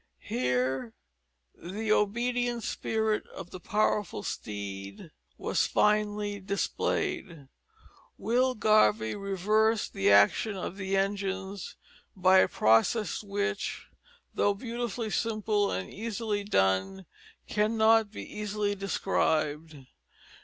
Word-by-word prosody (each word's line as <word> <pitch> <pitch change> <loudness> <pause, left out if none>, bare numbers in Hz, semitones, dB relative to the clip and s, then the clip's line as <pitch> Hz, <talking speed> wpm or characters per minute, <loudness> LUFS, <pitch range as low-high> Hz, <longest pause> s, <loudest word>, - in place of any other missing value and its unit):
Here 125 -1 -1 0.6
the 210 +5 -4
obedient 240 +3 +1
spirit 220 0 -1
of 190 -2 -10
the 185 - -8
powerful 210 - 0
steed 100 -2 -6 0.3
was - - 0
finely 210 -1 +1
displayed. 200 - -2 0.7
Will 255 +2 +1
Garvie 110 - +3
reversed 210 +3 +1
the 95 - +2
action 100 - +4
of 185 +1 -5
the 195 0 -1
engines 195 -1 -2 0.4
by 185 0 +5
a - - +5
process 115 - +2
which, 200 - -3 0.4
though 205 0 +2
beautifully 235 -1 -4
simple 215 -2 0
and 95 0 -3
easily 215 -1 -3
done, 95 - +1 0.4
cannot 220 0 +3
be 215 - -8
easily 210 -1 -2
described. 160 -5 -1
200 Hz, 95 wpm, -29 LUFS, 155-215 Hz, 0.7 s, by